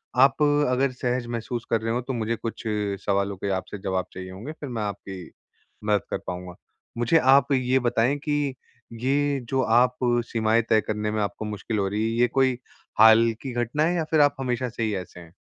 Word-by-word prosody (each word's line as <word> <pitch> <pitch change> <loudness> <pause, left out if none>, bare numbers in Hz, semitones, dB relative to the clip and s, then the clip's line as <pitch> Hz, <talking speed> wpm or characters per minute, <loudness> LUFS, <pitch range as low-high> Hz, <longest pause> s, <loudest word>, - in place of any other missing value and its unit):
आप 135 +4 +4
अगर 140 -3 +2
सहज 125 -1 -2
महसूस 120 0 -4
कर 115 -1 +1
रहे 115 +1 -1
हों, 125 - -1
तो 130 +2 -5
मुझे 115 -1 -1
कुछ 115 0 -6 0.4
सवालों 100 -1 0
के 100 - -3
आपसे 105 - -9
जवाब 95 -2 -1
चाहिए 95 0 -7
होंगे, 105 +11 -7
फिर 150 -3 -8
मैं 115 -3 -3
आपकी 95 -3 -6 0.6
मदद 105 -2 +2
कर - - -1
पाऊँगा। 90 0 -6 0.4
मुझे 120 +7 +3 0.2
आप 140 0 +3
ये 130 0 +2
बताएँ 120 +2 +1
कि 145 -3 0 0.5
ये 140 +2 +1
जो 135 -1 +1
आप 125 +2 +3 0.3
सीमाएँ 110 0 +2
तय 110 -1 +4
करने 105 0 -2
में 110 -1 -1
आपको 105 +1 -3
मुश्किल 105 +1 -4
हो 95 - +1
रही 105 +2 -1
है, 115 +1 -1
ये 125 - +5
कोई 130 0 +1 0.4
हाल 110 +1 +7
की 135 - -5
घटना 120 +5 0
है 175 +2 +1
या 165 - 0
फिर 155 -2 +4
आप 145 0 +4
हमेशा 125 -1 -1
से 115 0 -4
ही 110 -2 0
ऐसे 90 -1 -7
हैं? 85 -1 -14
115 Hz, 205 wpm, -25 LUFS, 105-130 Hz, 0.6 s, हाल